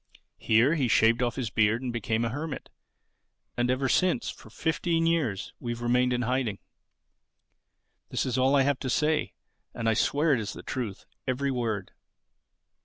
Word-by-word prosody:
Here 115 +7 +4
he 140 -6 +1
shaved 115 +1 +4
off 120 -2 0
his 120 -6 -3
beard 110 +3 +2
and 125 -2 -3
became 115 0 -1
a - - 0
hermit. 145 +4 -5 0.8
And 120 0 0
ever 130 +1 +1
since, 180 -1 +2
for - - -14
fifteen 165 +6 0
years, 145 - 0
we've 120 -1 -4
remained 125 +1 +2
in 125 0 0
hiding. 125 -4 0 1.5
This - - -1
is 125 -3 -1
all 130 +2 +3
I 135 - +5
have 140 -1 +1
to 130 - -3
say. 150 +4 +1 0.4
And 115 -1 -2
I 115 - +4
swear 145 +7 +2
it 125 - +2
is 105 -1 -4
the - - -10
truth, 115 -7 -4 0.2
every 135 +2 0
word." 115 -6 -2
125 Hz, 170 wpm, -28 LUFS, 115-140 Hz, 1.5 s, I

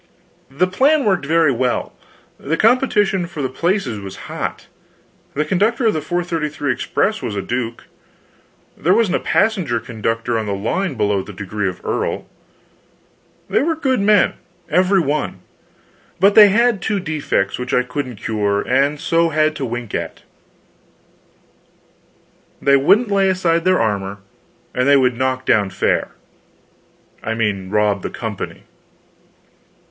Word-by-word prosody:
The 140 +7 +1
plan 270 +10 +2
worked 190 -8 +1
very 165 -1 +3
well, 125 0 -1 0.5
the 160 +4 -2
competition 215 -6 +2
for 155 -4 -6
the 130 - -1
places 170 - -1
was 95 -1 -8
hot. - - -5 0.7
The 150 +2 0
conductor 215 +9 +1
of 220 - +3
the 155 - -1
4.33 155 -5 -2
express 215 +2 -1
was 105 - -4
a 100 - -1
duke; 120 +1 -3 0.9
there 180 +6 +2
wasn't 215 -5 +2
a - - -5
passenger 185 - +1
conductor 115 0 -2
on 110 - -4
the 100 - -1
line 140 - -2
below 105 -3 +1
the 105 - -10
degree 100 +1 -3
of 90 - -10
earl. - - -2 1.2
They - - +1
were 325 +3 0
good 265 -6 0
men, 205 0 +4 0.4
every 185 +2 +3
one, 150 -2 -2 0.8
but 200 +3 +5
they 210 -1 +9
had 230 0 +2
two 205 0 -1
defects 150 - -1
which 125 0 -4
I 125 - +3
couldn't 125 -1 -5
cure, 100 -1 -1
and 140 +3 +1
so 165 +2 +2
had 155 0 +1
to 135 - -3
wink 120 -2 -5
at: - - -4 2.4
they 140 0 +4
wouldn't 205 - +3
lay 195 -1 +3
aside 170 -2 +1
their 185 0 +3
armor, 100 -3 -1 0.6
and 125 +2 0
they 140 0 +6
would 125 -2 +2
"knock 130 +1 -1
down" 105 -4 +3
fare - - 0 1.1
I 110 - -3
mean 100 -4 -1
rob 105 -1 +1
the - - -4
company. - - -6
145 Hz, 145 wpm, -19 LUFS, 115-190 Hz, 2.4 s, they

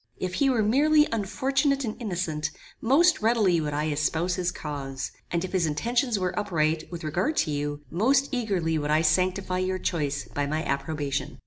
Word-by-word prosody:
If 185 -1 -3
he 270 +8 +2
were 240 -4 +2
merely 300 +7 +4
unfortunate 270 +6 0
and 215 - -3
innocent, 170 -7 -2 0.3
most 310 +7 +4
readily 215 -7 +3
would 150 -1 -2
I 150 +1 0
espouse 160 +4 0
his 180 -1 0
cause; 135 -3 -5 0.2
and 170 +1 -1
if 185 - -7
his 180 -4 +1
intentions 235 - 0
were 185 -2 -1
upright 160 -5 0
with 170 -2 -6
regard 175 - -1
to 155 - -3
you, 145 0 -3
most 265 +10 +3
eagerly 190 - 0
would 145 0 -3
I 155 +1 +3
sanctify 185 +3 +1
your 185 0 0
choice 145 -6 -2
by 145 0 -2
my 155 +2 -1
approbation. 140 -1 -2
180 Hz, 180 wpm, -26 LUFS, 155-225 Hz, 0.3 s, merely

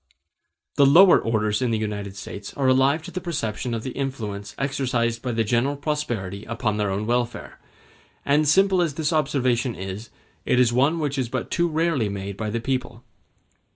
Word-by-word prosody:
The 140 - +6
lower 175 +7 +7
orders 105 -1 0
in 125 - +1
the 115 - +1
United 100 -2 -4
States 100 +1 -8
are 135 -2 0
alive 135 +4 +3
to - - -8
the 185 - -4
perception 120 - -3
of 110 - -4
the 130 - -4
influence 110 -7 -5
exercised 125 -4 -1
by 125 - -3
the 115 -1 +1
general 120 +6 +1
prosperity 120 -10 -3
upon 115 -2 -2
their 105 -1 0
own 100 +2 -2
welfare; 120 +1 -2 0.7
and 150 +2 +3
simple 190 +3 +4
as 160 -5 -1
this 155 0 -1
observation 130 -5 +1
is, 95 +4 -6 0.3
it 125 - +2
is 120 -2 +4
one 140 +7 +3
which 145 -4 -2
is 125 -3 -1
but 130 -1 -4
too 175 0 +2
rarely 160 -8 0
made 100 0 -5
by 110 +1 -3
the 115 +2 -2
people. 125 -1 -3
125 Hz, 185 wpm, -24 LUFS, 110-140 Hz, 0.7 s, lower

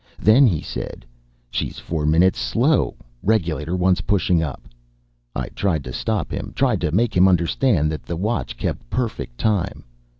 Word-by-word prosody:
Then 120 +6 +6
he 85 -8 0
said, - - -6 0.5
"She - - -1
is - - -11
four 80 -3 -2
minutes 85 +5 +4
slow 125 - +1 0.3
regulator 85 -6 0
wants 90 0 +2
pushing 90 -4 +2
up." 70 -6 -4 0.7
I - - -3
tried 85 -8 -1
to 65 - -7
stop 110 - -2
him - - -5
tried - - +1
to 75 - 0
make 110 +7 +1
him 90 +1 +6
understand 85 - +2
that 75 - -4
the 85 - -5
watch 105 +6 -2
kept - - -4
perfect 110 - -3
time. 100 - 0
90 Hz, 165 wpm, -22 LUFS, 80-110 Hz, 0.7 s, Then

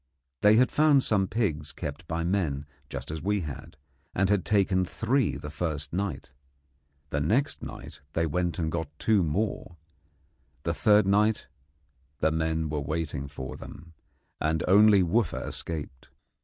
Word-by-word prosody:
They 105 +1 +6
had 125 +3 +4
found 150 -3 +4
some 100 -3 +2
pigs 80 -10 -1
kept 75 +3 -6
by 85 0 -2
men 85 -6 0 0.2
just - - -5
as 80 -1 -5
we 100 +1 0
had, 75 +1 -8 0.4
and 95 +1 +2
had 100 -3 +2
taken 95 -3 +2
three 115 +6 0
the 75 - -7
first 75 -2 -3
night. 90 -7 -3 0.8
The 70 - 0
next 110 - +1
night - - -9
they 80 - +1
went 85 +2 -1
and 80 -3 -1
got 80 -3 -3
two 105 0 +3
more; 85 +1 -2 0.9
the 85 - 0
third 105 +4 +4
night 105 +2 +2 0.7
the 80 - +2
men 80 0 0
were 75 -1 -2
waiting 75 -1 -3
for 65 -2 -7
them, 80 +2 -11 0.5
and 80 0 0
only 100 +1 +6
Wooffa 110 +6 0
escaped. 75 -6 -5
85 Hz, 150 wpm, -28 LUFS, 75-100 Hz, 0.9 s, They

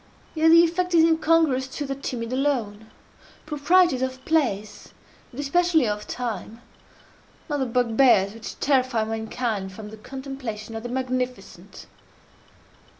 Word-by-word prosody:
Yet 320 0 +3
the 335 +1 +8
effect 350 +1 0
is 325 - +6
incongruous 320 -5 +3
to 290 - -3
the 275 - -3
timid 250 -3 -5
alone. 230 -6 -1 0.6
Proprieties 310 -1 +3
of 260 0 -4
place, 220 -11 -1 0.4
and 255 - -10
especially 320 -1 +2
of 210 0 -3
time, 230 -2 -5 0.9
are 290 - 0
the 265 - 0
bugbears 230 -4 +3
which 225 0 -9
terrify 255 -5 +2
mankind 220 -2 -3
from 210 +1 -9
the 220 - -10
contemplation 255 -3 -7
of 225 - -4
the 245 - -6
magnificent. 255 0 -4
255 Hz, 130 wpm, -24 LUFS, 225-290 Hz, 0.9 s, the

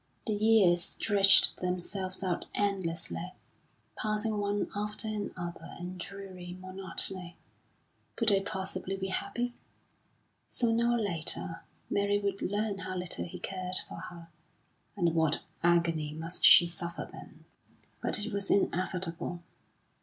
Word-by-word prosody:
The 215 - 0
years 205 -5 +5
stretched 195 +2 +5
themselves 185 +1 -3
out 180 -2 -2
endlessly, 170 - -2 0.6
passing 215 0 -1
one 205 0 -1
after 210 +2 -3
another 185 -5 -5
in 180 +1 -7
dreary 185 -2 -8
monotony. 185 -1 +1 0.8
Could 230 -2 +3
they 195 -1 +4
possibly 190 0 -3
be 190 0 -3
happy? 240 +5 -2 0.9
Sooner 235 0 +2
or 240 - +2
later 165 -5 0 0.3
Mary 200 0 +1
would 200 -1 -2
learn 205 +1 -1
how 185 -1 -4
little 180 -1 -1
he 170 - -8
cared 185 -1 -4
for - - -8
her, 170 -1 -10 0.7
and 170 -4 +2
what 160 -2 +2 0.2
agony 165 -3 +2
must 165 +3 -3
she 175 - +9
suffer 170 0 -3
then! - - -13 0.6
But - - 0
it 220 - -5
was 200 -1 -2
inevitable. 180 -2 -1
190 Hz, 125 wpm, -30 LUFS, 175-205 Hz, 0.9 s, she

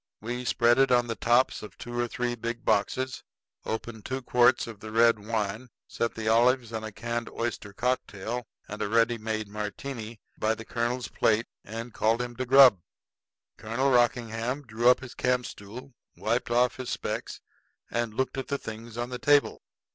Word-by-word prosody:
We 120 +3 -4
spread 120 +1 +3
it 135 -1 +4
on 120 -1 +4
the 115 -1 -3
tops 120 +3 +2
of 105 - -10
two 120 0 -7
or 120 - +1
three 120 +1 -2
big 115 +1 -5
boxes, 130 +5 0 0.4
opened 110 -1 -4
two 130 +3 -4
quarts 125 0 +4
of 115 -3 -9
the 110 0 -8
red 115 0 +5
wine, 110 +2 -3 0.2
set 115 - -2
the 110 -1 -4
olives 120 +1 +3
and 110 -1 -4
a 110 - -5
canned 115 +2 -4
oyster 115 -3 -4
cocktail 120 0 -2 0.2
and 105 - -7
a - - -1
ready 115 +1 +3
made 110 -1 -3
Martini 110 +2 -6 0.2
by 110 +1 +1
the 115 - -9
colonel's 120 +1 -2
plate, 115 +1 +2 0.2
and 115 +2 -7
called 115 +2 +2
him 120 0 -4
to 130 0 -3
grub. 130 -6 +8 0.8
Colonel 120 +5 0
Rockingham 120 +2 +1
drew 120 0 +2
up 125 - +4
his 130 -1 -9
campstool, 125 0 -3 0.2
wiped 115 +3 -1
off 120 +1 +2
his 130 -1 -5
specs, - - -4 0.5
and 115 -2 -2
looked 130 +2 -1
at 135 - -5
the 140 - -1
things 115 -1 -8
on 120 +1 -2
the 125 - -4
table. 145 +2 +3
120 Hz, 180 wpm, -28 LUFS, 110-125 Hz, 0.8 s, grub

